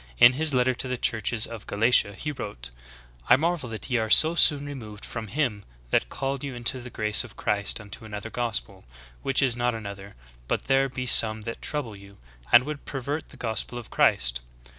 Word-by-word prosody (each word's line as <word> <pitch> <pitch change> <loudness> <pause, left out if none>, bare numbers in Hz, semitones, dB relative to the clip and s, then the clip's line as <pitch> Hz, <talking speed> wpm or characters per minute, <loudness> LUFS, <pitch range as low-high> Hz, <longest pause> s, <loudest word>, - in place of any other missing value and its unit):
In 120 - +7
his 155 +3 +1
letter 130 -1 +2
to 130 - -3
the 125 0 -3
churches 110 -1 0
of 115 -3 -9
Galatia 105 -1 +3
he 150 - -4
wrote: 65 - -7 0.6
'T - - +8
marvel 160 -2 -1
that 110 -1 -6
ye 125 - +2
are 110 0 -2
so 160 +8 +6
soon 145 -4 +4
removed 110 -8 -8
from 110 -1 -6
him 120 -5 -2 0.3
that - - +1
called 135 0 -4
you 140 -3 -5
into 120 +2 -1
the 125 - -9
grace 105 -1 +3
of 130 - -12
Christ 100 +1 0
unto 105 0 -9
another 110 0 -7
gospel: 110 -5 -4 0.4
Which 135 +1 +2
is 125 -3 +3
not 120 0 0
another; 100 -2 -9 0.3
but - - -1
there 135 0 +2
be 125 0 -5
some 110 -2 +5
that 115 +2 -7
trouble 140 -8 -3
you, 100 0 -15 0.3
and 120 - +8
would 150 +1 -7
pervert 145 +3 -4
the - - -14
gospel 115 +1 -1
of 120 -3 -9
Christ." - - +2
120 Hz, 200 wpm, -25 LUFS, 105-135 Hz, 0.6 s, T